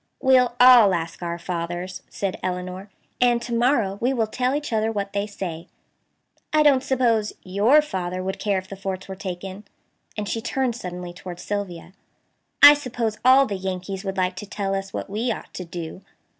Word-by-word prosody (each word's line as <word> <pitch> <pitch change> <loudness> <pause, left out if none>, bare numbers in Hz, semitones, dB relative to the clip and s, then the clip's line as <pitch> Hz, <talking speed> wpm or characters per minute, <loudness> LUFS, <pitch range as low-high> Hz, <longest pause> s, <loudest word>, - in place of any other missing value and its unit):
"We'll 255 -3 +4
all 245 -6 +8
ask 165 0 -5
our 170 -1 -3
fathers," 175 +1 -4
said 195 -2 -3
Elinor, 185 +2 -4 0.3
"and 240 -1 +4
to 235 - -5
morrow 230 -5 +1
we 250 +3 +2
will 230 -4 +1
tell 250 +4 -1
each 295 -4 -3
other 220 0 +1
what 200 -2 -3
they 200 +1 -1
say. 175 -5 -6 0.8
I 305 -1 +4
don't 280 -3 +5
suppose 240 -6 +1
YOUR 215 +11 +4
father 185 -8 -4
would 190 +1 -4
care 205 -2 0
if 185 0 -5
the 195 - -8
forts 190 -1 -5
were 190 - -6
taken," 190 +1 -6 0.5
and 210 -1 -3
she 225 - -2
turned 250 0 -1
suddenly 180 -5 -7
toward 175 -1 -9
Sylvia. 185 -4 -5 0.7
"I 290 0 +12
suppose 245 -6 -3
all 260 +2 +7
the 210 - -4
Yankees 190 0 -4
would 195 -1 -4
like 185 0 0
to 205 - -7
tell 200 -1 -3
us 195 0 -3
what - - -5
we 220 +5 -1
ought - - -7
to 185 - -6
do." 170 +1 -7
200 Hz, 185 wpm, -23 LUFS, 185-240 Hz, 0.8 s, I